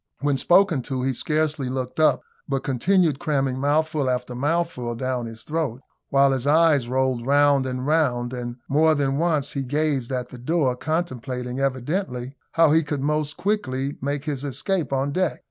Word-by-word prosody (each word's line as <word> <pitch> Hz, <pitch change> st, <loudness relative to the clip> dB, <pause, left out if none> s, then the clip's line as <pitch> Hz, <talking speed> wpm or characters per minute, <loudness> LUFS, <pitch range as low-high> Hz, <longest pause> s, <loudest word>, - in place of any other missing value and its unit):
When 145 Hz, -1 st, +1 dB
spoken 175 Hz, +1 st, +4 dB
to, 130 Hz, -2 st, -2 dB
he 135 Hz, 0 st, 0 dB
scarcely 150 Hz, 0 st, -1 dB
looked 130 Hz, +2 st, -4 dB
up, 155 Hz, -, +3 dB, 0.3 s
but 135 Hz, -1 st, -1 dB
continued 155 Hz, +3 st, +2 dB
cramming 135 Hz, -5 st, 0 dB
mouthful 150 Hz, 0 st, +1 dB
after 125 Hz, 0 st, -2 dB
mouthful 140 Hz, -3 st, -1 dB
down 125 Hz, -1 st, -2 dB
his 115 Hz, -1 st, -9 dB
throat, 150 Hz, -6 st, -2 dB, 0.3 s
while 140 Hz, 0 st, +4 dB
his 130 Hz, 0 st, -1 dB
eyes 150 Hz, -4 st, +4 dB
rolled 130 Hz, -1 st, 0 dB
round 140 Hz, 0 st, +3 dB
and 130 Hz, 0 st, -3 dB
round; 130 Hz, -6 st, +1 dB
and 120 Hz, -1 st, -5 dB
more 155 Hz, +3 st, +4 dB
than 140 Hz, -1 st, 0 dB
once 155 Hz, -3 st, +1 dB
he 140 Hz, -, -3 dB
gazed 140 Hz, -1 st, -1 dB
at 125 Hz, -1 st, -3 dB
the 125 Hz, -, -10 dB
door, 135 Hz, -1 st, +1 dB
contemplating 130 Hz, -5 st, -3 dB
evidently 130 Hz, -1 st, -2 dB, 0.2 s
how 165 Hz, -2 st, +5 dB
he 160 Hz, +1 st, +5 dB
could 145 Hz, -3 st, -3 dB
most 150 Hz, 0 st, -1 dB
quickly 140 Hz, -10 st, -2 dB
make 140 Hz, +1 st, -2 dB
his 145 Hz, -3 st, -3 dB
escape 150 Hz, +2 st, -2 dB
on 135 Hz, +1 st, 0 dB
deck. 185 Hz, +3 st, 0 dB
140 Hz, 170 wpm, -23 LUFS, 130-155 Hz, 0.3 s, how